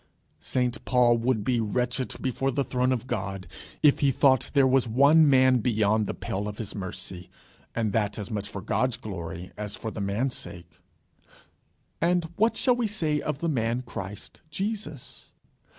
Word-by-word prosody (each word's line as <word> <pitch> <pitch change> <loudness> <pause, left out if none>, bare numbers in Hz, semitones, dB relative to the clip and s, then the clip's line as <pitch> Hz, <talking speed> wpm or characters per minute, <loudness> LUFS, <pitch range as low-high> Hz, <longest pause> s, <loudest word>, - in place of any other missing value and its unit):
St 125 -2 -1
Paul 120 -2 +4
would 115 -2 0
be 125 +1 +1
wretched 125 +4 -1
before 135 +1 0
the 140 +1 0
throne 125 0 0
of 125 -2 -1
God, 100 -6 -4 0.4
if 150 -2 +5
he 140 - +3
thought 130 0 +3
there 140 -1 +6
was 130 -1 +3
one 145 +6 +5
man 130 -1 +5
beyond 110 -2 +1
the - - -3
pale 100 +2 -3
of 105 0 -6
his 110 -4 -6
mercy, 95 -2 -6 0.5
and 110 -3 0
that 105 -2 0
as 105 -1 -6
much 105 -2 -3
for 100 - -6
God's 125 +2 0
glory 90 -3 -7
as 105 -1 -4
for 110 - -5
the 105 - -5
man's 105 +7 -1
sake. 85 -1 -10 1.2
And 175 +1 +2
what 225 +5 +2
shall 250 -2 +3
we 240 -2 0
say 160 -8 -1
of 150 -2 -3
the 170 - 0
man 120 -4 0
Christ 100 -4 -8
Jesus? 195 - -5
125 Hz, 170 wpm, -27 LUFS, 105-135 Hz, 1.2 s, there